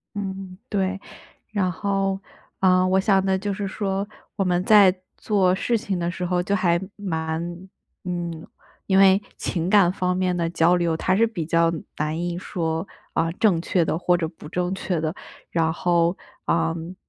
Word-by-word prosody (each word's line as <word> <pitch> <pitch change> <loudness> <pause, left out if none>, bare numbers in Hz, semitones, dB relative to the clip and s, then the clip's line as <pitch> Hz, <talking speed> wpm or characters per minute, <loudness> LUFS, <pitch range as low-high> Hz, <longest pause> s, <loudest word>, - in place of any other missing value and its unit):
嗯， 190 -2 -5
对。 195 -1 -1 0.5
然 200 -4 0
后， 195 +1 -1 0.4
呃， 185 -1 +4
我 190 +1 +3
想 195 -1 +3
的 190 0 +2
就 205 +1 -2
是 200 +1 -3
说， 195 0 -2 0.3
我 195 - +1
们 180 -1 +1
在 200 -3 +7 0.2
做 190 -4 +2
事 235 +5 0
情 195 -4 -2
的 170 0 -1
时 180 0 -4
候 180 0 +1
就 200 +2 -1
还 175 -2 +2 0.2
蛮 160 -5 -2 0.6
嗯， 170 -2 -4 0.4
因 190 -1 +3
为 195 0 +6 0.2
情 170 0 -2
感 195 -4 +5
方 180 -1 -1
面 185 -1 0
的 170 -1 0
交 170 +1 +3
流， 170 -2 +1
它 185 +3 +1
是 230 +2 +4
比 200 -8 -4
较 165 0 +3 0.3
难 155 +2 -1
以 175 0 -2
说， 165 -2 -2 0.3
啊， 165 0 +1
正 185 -2 +2
确 170 0 +1
的 160 - -1
或 180 0 +3
者 165 -2 -2
不 155 -2 -12
正 180 +2 -1
确 185 -3 -2
的， 160 +2 -2 0.4
然 160 -1 +1
后， 170 +1 +1 0.3
嗯， 165 +1 -1
180 Hz, 185 characters per minute, -23 LUFS, 170-195 Hz, 0.6 s, 在